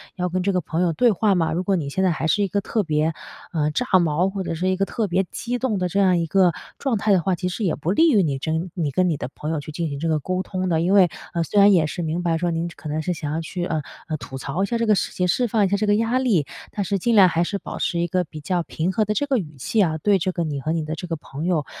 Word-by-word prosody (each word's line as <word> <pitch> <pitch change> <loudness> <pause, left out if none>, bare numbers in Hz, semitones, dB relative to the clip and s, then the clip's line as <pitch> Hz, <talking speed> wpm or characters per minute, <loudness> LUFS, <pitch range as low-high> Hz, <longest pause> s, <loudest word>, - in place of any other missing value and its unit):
要 180 -1 -1
跟 185 +1 -1
这 200 - +2
个 180 - +2
朋 165 +2 -2
友 175 - +2
对 240 +7 +4
话 205 +1 +2
嘛， 165 -3 +1
如 175 +3 -1
果 195 +1 +1
你 145 -4 -3
现 190 +7 -1
在 185 - +3
还 160 0 -1
是 205 +6 +2
一 - - +1
个 205 - 0
特 215 +2 -1
别， 155 -1 0 0.4
呃， 150 -2 +1
炸 250 - -1 0.2
毛， 170 +3 +1
或 195 -1 -4
者 165 - -3
是 180 +3 -1
一 185 - +2
个 195 - 0
特 220 +1 -2
别 185 +1 +1
激 245 +1 -3
动 240 -5 0
的 180 - 0
这 195 +3 -1
样 185 -2 +4
一 170 - 0
个 180 +2 +4 0.3
状 265 -5 0
态 205 +1 +1
的 185 - +3
话， 185 +2 0
其 180 +1 -3
实 215 - -4
也 175 -6 +1
不 160 +4 -2
利 330 +8 +5
于 215 -6 +5
你 140 -4 -1
真 160 +5 -2
你 160 -6 -2
跟 180 +5 +2
你 160 - +1
的 130 - -5
朋 150 - -5
友 160 - -1
去 155 - -8
进 165 +2 -2
行 140 - -4
这 165 - -2
个 155 -1 +1
沟 185 +5 -2
通 185 -1 -3
的。 160 -1 +2
因 185 +3 +2
为， 190 -3 +6 0.2
呃， 170 -1 0
虽 205 +6 +1
然 200 +1 +7
也 170 -4 +4
是 155 - -4
明 165 +1 -2
白 165 -2 +1
说， 175 +1 -1
您 165 +1 -1
可 155 - -8
能 155 +1 -1
是 180 +3 -1
想 150 -3 -4
要 160 - -1
去， 175 +2 -4
呃， 160 -3 -1 0.3
呃， 155 -2 -2
吐 135 -2 -8
槽 155 +8 -2
一 - - +3
下 235 +3 -1
这 230 - 0
个 215 -1 +4
事 - - -1
情， 180 - 0
释 245 +7 +1
放 215 -1 +2
一 - - +2
下 200 - +1
这 210 +1 -1
个 205 - +4
压 230 +4 +1
力， 215 - +2 0.3
但 205 - -2
是 195 +2 -1
尽 235 +5 +1
量 190 -3 +7
还 170 0 +1
是 200 - -2
保 - - -7
持 170 - 0
一 170 - +1
个 180 +2 0
比 155 -2 -10
较 175 +3 -1
平 165 +2 -2
和 215 +2 +1
的 210 - 0
这 285 - 0
个 270 -3 +2
语 155 -7 -5
气 210 - 0
啊， 160 -4 +1
对 200 +5 +3
这 185 +1 0
个 170 -1 -2
你 145 -3 -3
和 155 - -2
你 165 -1 0
的 155 +1 -4
这 180 - -7
个 165 - -2
朋 150 0 -7
友， 170 -5 +1
180 Hz, 355 characters per minute, -23 LUFS, 160-200 Hz, 0.4 s, 然